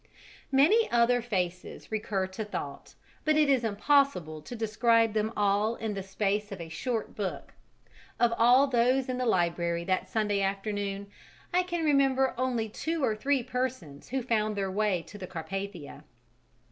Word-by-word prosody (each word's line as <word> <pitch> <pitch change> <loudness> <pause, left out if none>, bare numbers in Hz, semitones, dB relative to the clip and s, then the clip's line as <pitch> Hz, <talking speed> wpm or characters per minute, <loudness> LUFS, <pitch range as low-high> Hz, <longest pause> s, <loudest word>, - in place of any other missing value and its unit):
Many 335 +13 +4
other 240 +1 +3
faces 180 -6 -4
recur 210 -3 -1
to 190 +4 -5
thought, 145 -9 -7 0.3
but 310 0 +3
it 300 -2 +4
is 260 -3 +2
impossible 215 - +1
to 240 - -8
describe 225 0 +2
them 215 0 0
all 205 +2 +2
in 220 -2 -3
the 195 - -4
space 205 +2 -1
of 195 - -6
a 165 -1 -7
short 225 +8 -3
book: 200 -3 -4 0.7
of 240 -1 +3
all 245 +4 +6
those 255 0 +2
in 255 -1 -2
the 250 - 0
library 170 -3 +1
that 185 +1 -1
Sunday 210 -2 0
afternoon, 200 0 -2 0.5
I 360 - +4
can 345 -2 -2
remember 270 -2 +3
only 245 -3 -1
two 320 +8 -3
or 220 - +2
three 270 +3 0
persons 240 - -4
who 265 0 -2
found 215 -3 0
their 195 -1 -2
way 200 -3 0
to 205 - -12
the 185 - -6
Carpathia. 185 -1 -6
215 Hz, 160 wpm, -29 LUFS, 195-255 Hz, 0.7 s, all